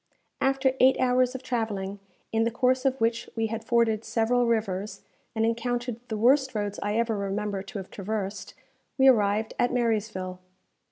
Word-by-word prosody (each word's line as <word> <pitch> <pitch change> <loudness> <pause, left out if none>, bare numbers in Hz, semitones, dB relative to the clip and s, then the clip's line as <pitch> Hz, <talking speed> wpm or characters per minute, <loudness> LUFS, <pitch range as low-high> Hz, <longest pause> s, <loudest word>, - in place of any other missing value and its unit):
After 270 -1 +2
eight 260 +1 +5
hours 255 0 +2
of 260 - -6
travelling, 210 -6 -3 0.3
in 225 0 +2
the 230 - +2
course 255 +2 +1
of 265 0 +1
which 230 +1 0
we 225 -1 0
had 225 0 -4
forded 225 -2 +2
several 240 +2 +1
rivers, 210 -3 -2 0.3
and 220 0 +2
encountered 240 +1 -2
the 220 - -3
worst 260 +3 +3
roads 205 -1 -2
I 205 +1 -1
ever 230 -1 +1
remember 200 0 -2
to 200 +3 -8
have 190 -1 -7
traversed, 200 -1 -4 0.4
we 265 - +5
arrived 215 -3 +3
at 245 - +2
Marysville. 215 -6 -1
225 Hz, 165 wpm, -27 LUFS, 205-245 Hz, 0.4 s, eight